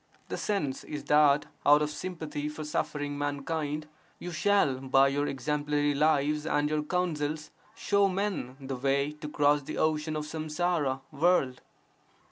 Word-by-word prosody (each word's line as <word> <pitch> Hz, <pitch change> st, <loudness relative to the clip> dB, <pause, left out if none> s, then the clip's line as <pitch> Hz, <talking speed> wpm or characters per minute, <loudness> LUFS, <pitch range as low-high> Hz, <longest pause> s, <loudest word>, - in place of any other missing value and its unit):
The -, -, -3 dB
sense 155 Hz, -11 st, -2 dB
is 150 Hz, -1 st, -6 dB
that 150 Hz, -1 st, +4 dB, 0.2 s
out 145 Hz, +1 st, +6 dB
of 150 Hz, -, -2 dB
sympathy 155 Hz, -3 st, -4 dB
for 155 Hz, +1 st, -6 dB
suffering 150 Hz, -1 st, -2 dB
mankind, 145 Hz, +1 st, -2 dB, 0.3 s
you 175 Hz, -, -6 dB
shall 165 Hz, -6 st, +2 dB
by 135 Hz, +1 st, +4 dB
your 145 Hz, +1 st, 0 dB
exemplary 145 Hz, +2 st, 0 dB
lives 150 Hz, +1 st, +2 dB
and 145 Hz, -1 st, +1 dB
your 155 Hz, 0 st, +1 dB
counsels 155 Hz, -2 st, -2 dB, 0.2 s
show 200 Hz, -1 st, +2 dB
men 190 Hz, -9 st, -2 dB
the 135 Hz, -1 st, -5 dB
way 140 Hz, +2 st, +1 dB
to 150 Hz, 0 st, -8 dB
cross 145 Hz, 0 st, +3 dB
the 150 Hz, +2 st, -6 dB
ocean 155 Hz, 0 st, 0 dB
of 150 Hz, 0 st, -3 dB
samsara 155 Hz, -3 st, -1 dB
(world). 145 Hz, -4 st, +2 dB
150 Hz, 145 wpm, -29 LUFS, 145-155 Hz, 0.3 s, out